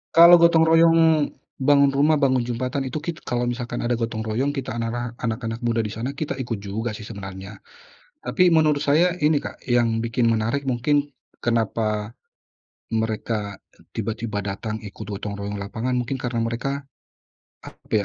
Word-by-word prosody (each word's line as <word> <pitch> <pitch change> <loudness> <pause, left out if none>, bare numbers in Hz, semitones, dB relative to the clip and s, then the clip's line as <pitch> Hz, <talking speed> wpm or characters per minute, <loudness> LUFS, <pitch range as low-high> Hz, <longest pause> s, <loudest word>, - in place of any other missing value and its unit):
Kalau 170 +1 +9
gotong 170 -1 +6
royong 165 -2 +5 0.3
bangun 140 0 +5
rumah, 150 +3 +3
bangun 130 -3 +2
jembatan 125 +4 -2
itu 130 - -4
kit 165 +2 -5
kalau 120 0 -1
misalkan 120 0 -3
ada 120 - +1
gotong 115 -1 -2
royong, 120 +6 0
kita 135 -5 -4
anara 120 +1 -3
anak-anak 115 0 -3
muda 115 -2 0
di 105 - -4
sana, 130 +5 -4
kita 155 - -2
ikut 115 -3 -3
juga 105 +4 -4
sih 105 - -9
sebenarnya. 95 -1 -8 0.6
Tapi 180 -1 +3
menurut 155 -3 +4
saya 155 +5 +3
ini, 150 -1 +2
Kak, - - -7
yang 120 -2 +2
bikin 115 0 +1
menarik 115 +6 0
mungkin 140 +3 0 0.3
kenapa 110 -2 -1 0.8
mereka 110 -2 -2 0.2
e - - -22
tiba-tiba 110 -2 -3
datang 105 +2 -4
ikut 105 -2 -9
gotong 100 0 -5
royong 100 0 -5
lapangan, 110 +5 -3
mungkin 125 +2 -3
karena 120 -2 -2
mereka 120 +5 -2 0.9
apa - - -15
120 Hz, 155 wpm, -23 LUFS, 110-140 Hz, 0.9 s, Kalau